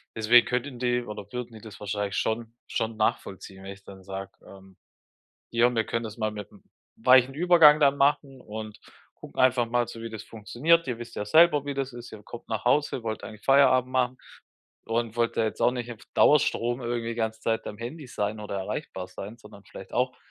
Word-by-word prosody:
deswegen 115 +2 +5
könnten 125 +1 -3
die 125 0 0
oder 105 -2 -9
würden 125 -1 -6
die 110 - -12
das 110 -2 -12
wahrscheinlich 105 -1 -3
schon 115 +1 -2
schon 115 -1 -3
nachvollziehen, 95 -2 -3
wenn 95 0 -7
ich 100 0 -18
dann 95 -1 -13
sage, 95 0 -7 0.2
ähm: 95 -1 -15 0.7
„Hier, 120 +1 +3
wir 115 - +1
können 115 0 -3
das 110 +1 -8
mal 110 -1 0
mit 105 -2 -8
'm - - -18 0.3
weichen 130 +2 +5
Übergang 160 -2 +6
dann 140 -1 +4
machen 140 -1 +1
und 110 0 -8 0.4
gucken - - -7
einfach 125 -2 +4
mal 120 0 0
so, 115 - -9
wie 115 0 -6
das 110 -2 -7
funktioniert. 135 - +1
Ihr 125 -3 -3
wisst 120 0 -9
ja 105 - -2
selber, 155 +4 +5
wie 140 - -3
das 135 -1 -3
ist. 120 0 -10
Ihr 105 - -10
kommt 115 +3 -11
nach 110 -1 -3
Hause, 130 0 +1
wollt 110 -1 -4
eigentlich 105 -1 -11
Feierabend 130 -2 +4
machen 130 -1 0 0.7
und 115 0 -2
wollt 120 -1 0
da 115 - +3
jetzt 110 - -3
auch - - +5
nicht 120 -1 -5
auf 115 - -10 0.2
Dauerstrom 120 -4 +3
irgendwie 120 -1 -3
die 115 - -4
ganze 110 -1 -2
Zeit 115 -1 -1
am 105 - -7
Handy 130 +6 -7
sein 105 -2 -3
oder 105 -1 -5
erreichbar 95 -1 -5
sein, 100 +5 -9
sondern 105 -3 -15
vielleicht 95 - -12
auch 125 0 0
115 Hz, 210 wpm, -26 LUFS, 105-125 Hz, 0.7 s, Übergang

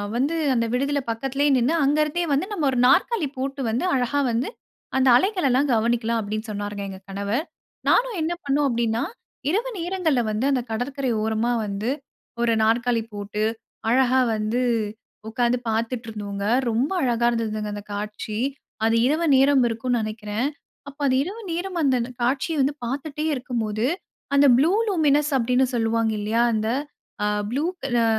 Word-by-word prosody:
வந்து 280 +7 +1 0.2
அந்த 230 -2 +1
விடுதில 280 +3 +1
பக்கத்துலயே 270 +5 0
நின்னு, 250 +6 +2
அங்க 285 +2 +3
இருந்தே 305 +4 -1
வந்து 280 +6 +1
நம்ம 350 -8 -1
1 255 - -2
நாற்காலி 360 - +3
போட்டு 270 +1 -3
வந்து, 230 +3 -1
அழகா 255 +3 +1
வந்து 235 - -1 0.5
அந்த 265 0 +3
அலைகளலாம் 290 - +2
கவனிக்கலாம் 230 0 +1
அப்பிடின்னு 215 +1 -4
சொன்னாருங்க 205 0 -4
எங்க 190 -1 -8
கணவர். 200 - -2 0.4
நானும் 485 -4 +3
என்ன 320 +2 0
பண்ணேன் 285 +1 +2
அப்பிடின்னா, 235 -2 0 0.5
இரவு 445 +8 0
நேரங்கள்ல 335 -6 0
வந்து 215 +5 -1
அந்த 260 -2 +1
கடற்கரை 260 +3 -2
ஓரமா 220 +2 0
வந்து, 205 +3 -3 0.5
1 235 -1 +3
நாற்காலி 235 +1 +2
போட்டு, 205 +1 -3 0.5
அழகா 260 +1 +4 0.2
வந்து 215 +3 -1 0.7
உக்காந்து 240 +2 +1
பாத்துட்டு 225 +1 -2
இருந்தோங்க. 200 -2 -5 0.2
ரொம்ப 240 +7 0
அழகா 240 -3 +1
இருந்ததுங்க 215 -2 -2
அந்த 205 - -7
காட்சி, 210 +1 -4 0.5
அது 225 0 +3
இரவு 315 +4 +1
நேரம் 270 0 +5
இருக்கும்னு 235 +1 -1
நெனக்கிறேன். 215 +2 -2 0.4
அப்ப 285 +1 -16
அது 260 - +3
இரவு 405 +8 -6
நேரம் 355 +2 -3
அந்த, 270 -2 +3
அந்த 240 +2 -4
காட்சிய 270 +6 0
வந்து 275 +2 +2
பாத்துட்டே 285 +4 -3
இருக்கும்போது, 230 -4 -2 0.5
அந்த 280 0 +6
ப்ளூ 300 +7 +4 0.2
லூமினஸ் 300 -5 +2
அப்பிடின்னு 250 +2 +2
சொல்லுவாங்க 225 -1 +1
இல்லயா! 220 +3 +1
அந்த 220 0 0 0.5
அ - - +2 0.2
ப்ளூ 275 +5 -1 0.2
க - - -32 0.2
அ - - +3
245 Hz, 155 wpm, -24 LUFS, 220-280 Hz, 0.7 s, அந்த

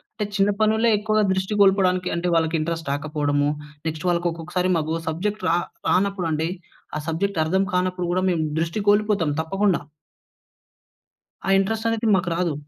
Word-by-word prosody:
అంటే, 210 - -2
చిన్న 200 0 +3
పనులే 220 +2 +3
ఎక్కువగా 215 0 +1
దృష్టి 190 +2 -2
కోల్పోడానికి 185 -2 +3
అంటే, 170 +1 -1
వాళ్ళకి 165 0 +1
ఇంట్రస్ట్ 165 -1 -3
రాకపోవడము, 145 0 0 0.4
నెక్స్ట్ 160 +3 -4
వాళ్ళక్కొక్కసారి 175 +1 -1
మాకో 160 0 -1
సబ్జెక్ట్ 205 +6 -3
రా 170 - +3 0.3
రానప్పుడంటే, 180 -5 +1 0.5
ఆ - - -1
సబ్జెక్ట్ 175 +3 -1
అర్థం 190 +4 +1
కానప్పుడు 180 -1 0
గూడా 185 +1 +1
మేము 160 -2 0 0.2
దృష్టి 170 +6 -2
కోల్పోతాం 205 -6 +2
తప్పకుండా. 195 +3 +1 1.7
ఆ - - +1
ఇంట్రెస్టనేది 225 +3 0
మాకు 180 -1 0
రాదు. 170 -3 0
180 Hz, 135 wpm, -23 LUFS, 165-200 Hz, 1.7 s, చిన్న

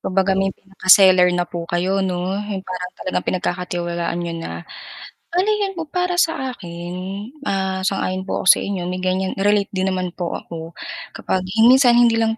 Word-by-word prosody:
Kung 185 - -4
baga 195 0 +3
may 195 0 +2
pinaka-seller 185 -2 +5
na 175 - +1
po 170 -1 -6
kayo, 185 +3 0
'no, 180 -1 -1
'yung 205 -2 -4
parang 180 -1 -5
talagang 185 - -3
pinagkakatiwalaan 175 -1 -2
niyo 170 -1 -3
na. 85 - -6 0.7
Ano, 360 +3 +1
yun 420 -2 0
po 330 - -3
para 360 0 -1
sa 265 -6 -1
akin, 175 -3 -8 0.6
ah, 190 -1 -1
sang-ayon 190 -1 -1
po - - -2
ako - - -5
sa - - +8
inyo 190 -3 -3
may, 180 - -3
ganyan 185 +1 -1
relate 205 0 +2
din 190 -1 -1
naman 185 -1 -2
po 175 -2 -3
ako, 165 0 -7 0.4
kapag 185 -1 -2 0.2
minsan 255 -1 +6
hindi 235 -1 +5
lang 225 0 +1
190 Hz, 180 wpm, -20 LUFS, 180-205 Hz, 0.7 s, sa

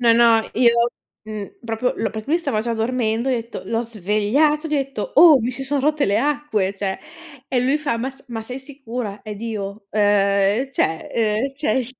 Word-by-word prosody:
No, 235 -1 +5
no, 230 -1 +4
io 235 0 +4 0.3
mh 215 -2 -5 0.2
proprio, 230 +2 -1 0.2
perché 220 -1 -6
lui 325 +4 +2
stava 225 -11 -1
già 235 +1 -2
dormendo, 230 +1 0
ho - - +2
detto, 235 -1 -4
l'ho 230 0 0
svegliato, 230 - +1
gli 305 - -1
ho - - +3
detto: 275 - -4
"Oh 320 -5 +9
mi 235 +2 -1
si 255 +2 -6
son 280 +1 0
rotte 300 +1 +2
le 200 +1 +2
acque, 275 -8 0
cioè" 195 -1 -3 0.5
e 255 - +1
lui 270 +4 +2
fa: 275 -6 -1
"Ma 260 +3 -2
s 270 +1 -18
ma 225 -2 -4
sei 250 +4 -6
sicura?" 250 -6 -6
Ed 210 -2 -7
io: 205 -2 -5
"Ehm 205 +3 +2
cioè, 160 -10 -1
ehm 225 +4 0
cioè 265 -3 0
235 Hz, 195 wpm, -21 LUFS, 215-270 Hz, 0.5 s, Oh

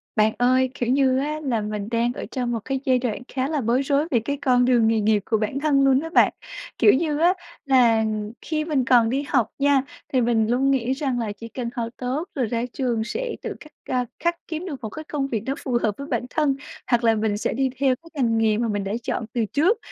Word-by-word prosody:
Bạn 215 0 +3
ơi, 255 +1 +3
kiểu 240 - -2
như 260 0 +3
á, 300 +2 -2
là 235 -6 0
mình 210 -1 -4
đang 235 +1 +1
ở - - -6
trong 250 -3 -2
một 230 - -1
cái 270 0 -1
giai 255 -1 +3
đoạn 240 -4 -3
khá 260 0 -2
là 300 -2 -1
bối 240 +4 +2
rối 280 +2 +1
về 240 - +3
cái 280 +6 -3
con 255 -3 +3
đường 240 -3 +4
nghề 225 0 +2
nghiệp 215 0 +3
của 220 - +1
bản 215 +5 -2
thân 285 -2 +3
luôn 265 -1 +5
á 325 - -5
bạn. 330 - +4 0.4
Kiểu 215 -4 +6
như 300 +1 0
á, 345 +3 +5 0.3
là 240 -5 +4 0.4
khi 310 -1 -2
mình 290 -6 0
còn 240 -3 +5
đi 270 +4 0
học 250 -7 +2
nha, 280 -1 +4 0.3
thì 255 - +3
mình 230 -2 +2
luôn 270 +3 +2
nghĩ 260 -1 +1
rằng 265 -3 -2
là 225 -3 -2
chỉ 220 +3 -9
cần 235 +1 -5
học 230 -1 -2
tốt 265 +7 -3
rồi 260 -4 +1
ra 230 +1 -2
trường 240 -4 -1
sẽ 480 - -3
tự - - -5
khắc, 305 - -14 0.2
à, 250 -1 +1 0.2
khắc 340 0 +2
kiếm 325 +2 -4
được 290 -8 -6
một 220 - -4
cái 310 +8 -8
công 290 -3 -2
việc 225 -6 -3
nó 265 - -1
phù 250 -3 0
hợp 210 -2 +1
với 280 - -7
bản 245 -3 -1
thân, 295 -2 +1 0.3
hoặc 240 -1 +2
là 225 -1 +4
mình 215 -1 0
sẽ - - -1
đi 265 +2 +1
theo 270 -2 +3
cái 330 +6 -18
ngành 230 -1 +2
nghề 220 -1 +2
mà 235 +1 0
mình 205 -2 -1
đã 195 +1 -3
chọn 230 - -2
từ 235 -3 +1
trước. 330 - +2
255 Hz, 255 wpm, -23 LUFS, 230-280 Hz, 0.4 s, Kiểu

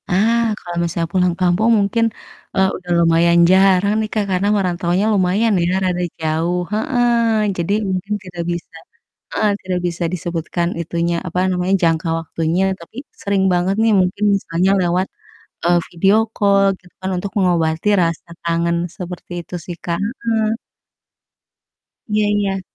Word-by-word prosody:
Ah, 220 +6 +3 0.2
kalau 175 -1 -7
misalnya 170 0 -2
pulang 180 -2 +2
kampung 185 +5 +2
mungkin, 210 +3 +1 0.5
eee, 190 0 +3
udah 180 -1 -8
lumayan 170 +1 +4
jarang 190 +1 +4
nih, 215 - -3
Kak, 215 -2 0
karena 185 +2 +1
merantaunya 180 0 0
lumayan 200 +3 +2
ya 180 - 0
rada 180 -1 0 0.2
jauh. 165 +3 0
Heeh. 235 -3 +2
Jadi 170 +3 0 0.2
mungkin 190 +2 -2
tidak 175 -2 -6
bisa 170 0 -6 0.6
heeh, 210 -1 +2
tidak 185 -1 -2
bisa 175 0 -3
disebutkan 170 0 -2
itunya, 170 +1 -1
apa 180 +1 -2
namanya, 180 +1 0
jangka 165 0 +2
waktunya 165 +2 -1 0.2
tapi 170 +7 -14 0.2
sering 200 -2 +1
banget 180 +2 +1
nih 225 0 +3
mungkin 185 +3 -1
misalnya 185 0 0
lewat, 180 +2 +1 0.6
eee, 175 0 +4
video 195 +4 +3 0.2
call 200 -1 +3 0.2
gitu 180 -1 -22
kan 190 0 -3
untuk 195 +2 -4
mengobati 170 -2 +1
rasa 165 0 -2 0.2
kangen 170 0 +1 0.2
seperti 180 -1 -8
itu - - -11
sih, 175 -1 -6
Kak. 170 -1 -1 0.3
Heeh. 225 -1 +1 1.5
Iya 210 -1 +1
iya. 200 -2 0
180 Hz, 145 wpm, -19 LUFS, 170-200 Hz, 1.5 s, lumayan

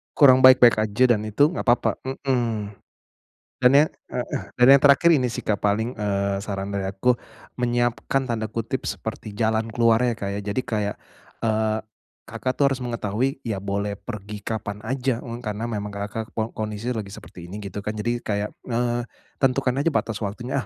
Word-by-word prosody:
Kurang 130 -4 +7
baik-baik 125 -3 +8
aja 110 +3 +1
dan 105 - -5
itu 145 +8 +3
enggak 180 - -4
papa 120 +1 +4
mhm. 120 -6 -1 0.9
Dan 125 0 +5
ya 145 +2 +6 0.3
heeh, - - -3 0.2
dan 125 - +7
yang - - -6
terakhir 145 +4 +6
ini 125 -4 0
sih, - - -4
Kak, 105 -2 -2
paling, 110 +4 0
eee, 100 -1 -1
saran 100 -1 -4
dari 95 -1 -2
aku, 120 +6 +2 0.4
menyiapkan 120 +2 0
tanda 115 -2 -1
kutip 115 +3 -3
seperti 110 -1 -5
"jalan 110 +1 0
keluarnya," 115 +1 +3
Kak, 105 -3 -5
ya. - - -2
Jadi 130 - 0
kayak, 105 -3 -2 0.5
eee, 110 -1 +1 0.5
Kakak 130 - -2
tuh - - +4
harus 130 - -6
mengetahui, 120 +3 -1
ya 100 -4 -2
boleh 100 +1 -2
pergi 105 -1 -7
kapan 105 -2 -4
aja, 125 0 -1
e - - -8 0.2
karena 105 +2 -3
memang 105 -1 -3
Kakak 105 +2 -5
kon 110 0 -1
kondisi 110 +2 -3
lagi 110 -4 -3
seperti 85 -3 -11
ini, 105 +3 -7
gitu 100 +1 -5
kan. 105 - -2
Jadi 120 +3 -1
kayak, 105 -2 -2 0.2
eee, 120 0 0 0.4
tentukan 135 -1 +1
aja 145 - +2
batas 115 -6 -1
waktunya, 120 +6 -3
115 Hz, 175 wpm, -24 LUFS, 105-125 Hz, 0.9 s, baik-baik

